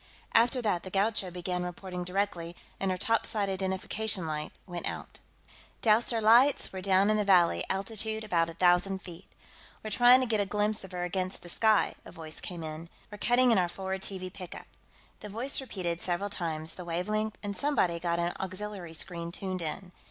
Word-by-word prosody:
After 240 +2 +4
that, 190 -6 +1
the 185 - -8
Gaucho 195 0 +1
began 180 0 -3
reporting 180 0 -5
directly, 180 -2 -2 0.2
and 195 - 0
her 185 - 0
topside 215 -1 +1
identification 190 +1 -1
light 155 -1 -3
went 175 -2 -4
out. - - -8 0.3
"... - - -25
doused 220 +2 +4
our 230 - +1
lights; 235 +5 +5
we're 190 - -5
down 195 +2 +4
in 215 - +2
the 210 - +2
valley, 185 -4 +4
altitude 220 +3 -1
about 170 -5 +1
a 165 - -9
thousand 180 +2 +3
feet. 175 0 -11 0.5
We're 215 - -5
trying 245 +3 +7
to - - +1
get 225 -3 +1
a 205 - +2
glimpse 210 +1 0
of 190 - -10
her 180 0 -2
against 185 +1 -2
the 175 - -9
sky," 220 +4 +3
a - - -11
voice 160 -1 -8
came 175 -3 -6
in. 155 +1 -7 0.2
"We're 210 - -9
cutting 245 +2 +4
in 220 - +5
our 175 -1 +1
forward 190 +1 -4
TV 185 -2 -3
pickup." 180 -3 -8 0.5
The 210 - -8
voice 245 +7 -1
repeated, 180 -9 -3
several 185 +3 -2
times, 160 -4 -3
the 180 - -8
wavelength, 210 +6 -1
and 200 -1 -3
somebody 190 -10 +1
got 170 0 0
an 170 0 0
auxiliary 190 -2 -5
screen 170 0 -3
tuned 185 0 -4
in. 180 +3 -5
190 Hz, 195 wpm, -30 LUFS, 175-215 Hz, 0.5 s, trying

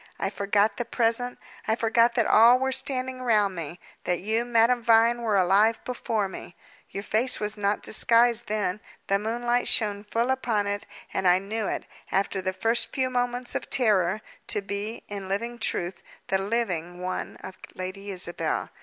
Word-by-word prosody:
I 195 - -2
forgot 200 +1 +1
the 240 - -2
present; 235 +1 0 0.3
I 220 - +2
forgot 230 +1 +3
that 235 -3 +2
all 235 +3 +7
were 265 +1 -1
standing 260 -1 -2
round 210 -6 +2
me; 170 +1 -6 0.3
that 180 -1 0
you, 220 +4 0
Madame 240 +1 +3
Vine, 230 +1 +4
were 220 -3 +1
alive 200 +5 +4
before 225 -4 -1
me. 185 -1 -10 0.3
Your 200 - -6
face 235 +5 0
was 210 0 -1
not 205 0 -1
disguised 235 +1 +3
then; 210 -2 -1 0.3
the 195 0 +1
moonlight 240 +3 0
shone 205 -2 +2
full 230 +4 0
upon 230 -6 0
it, 205 0 -3 0.3
and 190 - 0
I 180 0 +6
knew 205 +3 -3
it, - - -3 0.3
after 195 0 0
the 185 0 -1
first 225 +5 +1
few 260 -1 -1
moments 245 0 -1
of - - -4
terror, 210 -5 +2 0.3
to 210 - -1
be, 200 +3 -5
in 200 -1 -6
dreadful 235 +5 -3
truth, 180 -5 -2 0.3
the 190 - +2
living 190 -5 -2
one 185 0 -4
of 190 - -10 0.2
Lady 185 +2 -6
Isabel. 180 -3 -2
215 Hz, 170 wpm, -26 LUFS, 195-235 Hz, 0.3 s, all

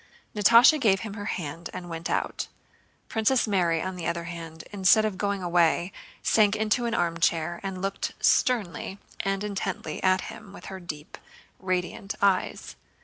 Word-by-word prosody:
Natásha 235 +8 +7
gave 195 -5 +3
him 215 -3 -6
her 205 -1 -6
hand 165 -3 -4
and 175 - -6
went 165 0 -5
out. - - -1 0.6
Princess 230 +3 +2
Mary 175 -5 +1
on 185 0 -4
the 165 -2 -4
other 170 0 -2
hand 165 -2 -8
instead 205 +2 +5
of 215 -3 -1
going 200 0 -2
away 175 +1 +2 0.3
sank 210 -1 +4
into 220 +3 +1
an 230 - -1
armchair, 165 0 0
and 190 -1 -5
looked 195 0 -2
sternly 200 -6 +1 0.2
and 195 0 -1
intently 195 -6 -4
at 185 -1 +3
him 205 -2 -9
with - - -11
her 190 - -6
deep, 155 -4 -8 0.4
radiant 185 +1 -2
eyes. 195 -2 0
190 Hz, 155 wpm, -26 LUFS, 170-205 Hz, 0.6 s, Natásha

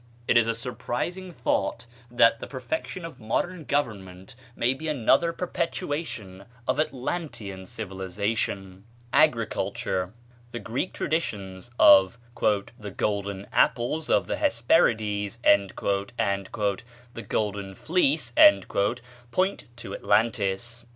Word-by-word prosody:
It - - +3
is 115 -1 +5
a 115 - 0
surprising 130 +9 -4
thought 115 - -1 0.2
that 115 -1 +4
the - - -7
perfection 145 +6 -4
of 165 - -9
modern 160 +9 -2
government 95 -9 -3 0.2
may 125 +2 +2
be 155 +4 -7
another 150 +4 +3
perpetuation 145 - -4 0.2
of 130 - +1
Atlantean 125 - -3
civilization. 95 -1 -3 0.3
Agriculture. 110 -8 +1 0.4
The 120 - -3
Greek 125 +12 -3
traditions 105 - -3
of 95 +1 +7 0.2
"the 105 +1 -1
golden 100 -1 -2
apples 150 +7 +1
of - - +3
the - - -2
Hesperides" 110 - +2
and 100 -1 +5
"the 100 +4 -3
golden 100 -2 -2
fleece" 160 - +1 1.0
point 190 +8 0
to 110 -5 -8
Atlantis. 110 +2 0
115 Hz, 105 wpm, -26 LUFS, 100-140 Hz, 1.0 s, of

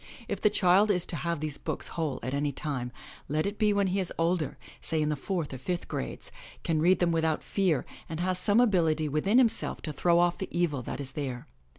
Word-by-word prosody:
If - - -3
the 210 - +5
child 190 +2 +4
is 180 -4 +2
to - - -5
have 170 -1 -2
these 150 -2 0
books - - -3
whole 155 -6 -2
at 130 +2 -3
any 145 +1 0
time, 130 -3 -4 0.4
let 155 +2 0
it 205 +1 -3
be 210 -1 +4
when 200 -1 +2
he 190 +1 0
is 185 - +1
older, 165 -2 0 0.2
say 160 - -1
in 150 0 +1
the 150 - 0
fourth 165 0 -3
or 130 - -6
fifth 175 +6 -3
grades, 60 - -5 0.3
can 160 -2 +1
read 180 +3 +5
them 175 -1 +2
without 160 -1 +1
fear 180 -9 +1 0.2
and 160 -1 -4
has 180 +1 0
some 205 +3 +3
ability 165 -9 +3
within 155 - +2
himself 230 -3 +2
to 155 - -4
throw 170 +4 +3
off 175 0 +2
the 190 - -4
evil 170 -6 0
that 125 - -5
is 135 -2 -6
there. 135 -4 -4
165 Hz, 230 wpm, -29 LUFS, 150-185 Hz, 0.4 s, the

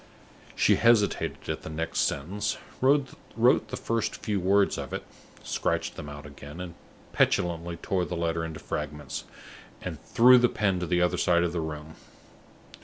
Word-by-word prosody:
She - - +4
hesitated 115 -3 +2
at - - -3
the - - -8
next 80 +1 -3
sentence, 100 +9 -1 0.2
wrote 135 +1 +3 0.2
the - - +3
first 115 -1 -1
few 105 -3 -2
words 100 +2 +3
of - - -6
it, - - -3 0.4
scratched - - -1
them 75 - -7
out 75 0 -9
again, 70 +2 -10
and 90 -2 -6 0.4
petulantly 85 0 +1
tore 95 -2 -1
the 90 - -4
letter 85 0 -1
into 80 -1 -5
fragments, 75 -1 -5 0.5
and - - -6
threw 125 +2 +6
the 120 0 +4
pen 95 -4 0
to 90 - -3
the 90 +1 +2
other 90 - +1
end 85 0 +4
of 85 - -2
the 85 - -1
room. 80 0 -6
85 Hz, 165 wpm, -27 LUFS, 80-100 Hz, 0.5 s, threw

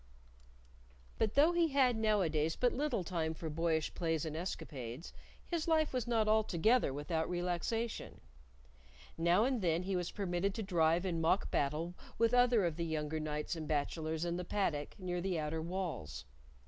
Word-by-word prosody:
But 215 -2 +1
though 300 +4 +6
he 345 -1 +3
had 270 -4 +3
nowadays 175 -8 +1
but 245 -1 +2
little 290 -8 0
time 160 -2 -2
for 160 -1 -5
boyish 160 0 0
plays 165 -3 -1
and 155 -1 -4
escapades, 145 -5 -5 0.3
his 340 -2 -2
life 315 -3 +2
was 250 -2 -1
not 225 -2 +2
altogether 215 - +3
without 160 +4 -2
relaxation. 180 +6 -2 1.0
Now 170 +5 +3
and 255 -3 0
then 170 -1 +1
he 190 +1 -1
was 180 -1 -1
permitted 195 0 -1
to 225 - -3
drive 170 -2 +2
in 170 -3 -1
mock 170 +4 +2
battle 155 +5 0 0.2
with 230 +1 +3
other 245 -5 +5
of 165 -2 -1
the 170 - -1
younger 155 -1 -2
knights 150 +2 -3
and 160 -2 -5
bachelors 155 +2 -1
in 170 0 -1
the 180 - -3
paddock 165 -6 -1
near 180 -2 -3
the 185 -1 -1
outer 155 +1 -2
walls. 160 - -4
175 Hz, 165 wpm, -35 LUFS, 160-215 Hz, 1.0 s, though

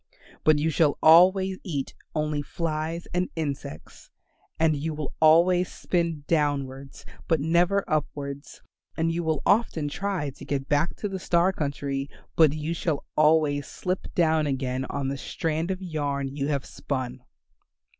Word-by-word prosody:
But 155 -1 +5
you 160 +2 +1
shall 150 -1 +2
always 185 +4 +6
eat 145 -7 -3 0.2
only 150 -1 0
flies 160 +2 -3
and 180 +1 0
insects. 140 - -6 0.5
And 160 -1 +3
you 155 +2 -3
will 150 -3 -5
always 175 +3 +5
spin 170 -4 -1
downwards 140 -4 -1 0.2
but 165 -2 +2
never 175 +6 +2
upwards, 140 -2 -4 0.3
and 165 0 +1
you 170 +1 -2
will 160 -3 -1
often 185 -9 +2
try 180 -4 -2
to 135 - -13
get 135 -1 -3
back 145 +4 +1
to 210 - -3
the 190 -1 -4
star 175 +1 +2
country, 140 -3 -3 0.3
but 160 -3 +6
you 155 +2 -3
shall 160 -3 -2
always 150 -2 +3
slip 185 +1 -4
down 160 -3 +3
again 130 -1 -2
on 140 0 -3
the 140 0 -4
strand 160 +2 -2
of 190 0 -3
yarn 140 -5 -2
you 140 -1 -1
have 140 -3 -1
spun." 130 -2 -4
155 Hz, 150 wpm, -26 LUFS, 140-170 Hz, 0.5 s, always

